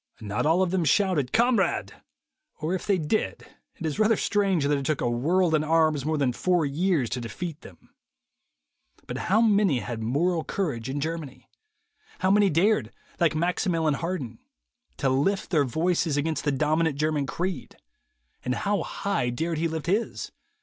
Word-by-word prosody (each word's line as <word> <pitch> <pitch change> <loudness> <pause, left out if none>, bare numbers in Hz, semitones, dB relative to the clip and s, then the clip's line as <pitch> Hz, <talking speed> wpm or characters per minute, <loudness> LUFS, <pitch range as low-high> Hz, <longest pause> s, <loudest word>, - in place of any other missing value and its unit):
Not 105 +5 -2
all 170 +4 +4
of 180 - -1
them 185 -2 +1
shouted 160 -4 +2
"Kamerad," 240 +1 +2 0.7
or 155 +3 -2
if 190 - -4
they 200 -2 +3
did, 165 +6 -2 0.3
it 165 - -7
is 155 +5 -2
rather 215 0 +4
strange 195 -7 +1
that 145 +1 +2
it 140 - -2
took 145 +1 -1
a - - 0
world 160 +9 +1
in 155 -1 +3
arms 155 -3 +2
more 155 0 0
than 135 -4 +1
four 175 +3 +1
years 155 -1 +1
to 125 - -2
defeat 160 +7 -6
them. 90 - -16 1.1
But - - -5
how 215 +4 +4
many 205 - +3
had 115 0 -5
moral 160 +9 0
courage 135 - -3
in 140 +2 -3
Germany? 155 -3 -5 0.7
How 185 - +1
many 205 0 +4
dared, 165 - +2 0.3
like 170 -3 +2
Maximilien 165 -1 +1
Harden, 140 -8 -4 0.6
to 140 - 0
lift 145 +10 0
their 150 -5 +3
voices 160 +2 0
against 150 0 -1
the 145 - +2
dominant 155 +2 +1
German 150 -2 0
creed, 180 +4 -4 0.7
and 125 - -1
how 205 0 0
high 200 -11 -2
dared 160 +6 -2
he 165 - +1
lift 160 -1 -4
his? 205 +7 -1
160 Hz, 170 wpm, -26 LUFS, 140-185 Hz, 1.1 s, all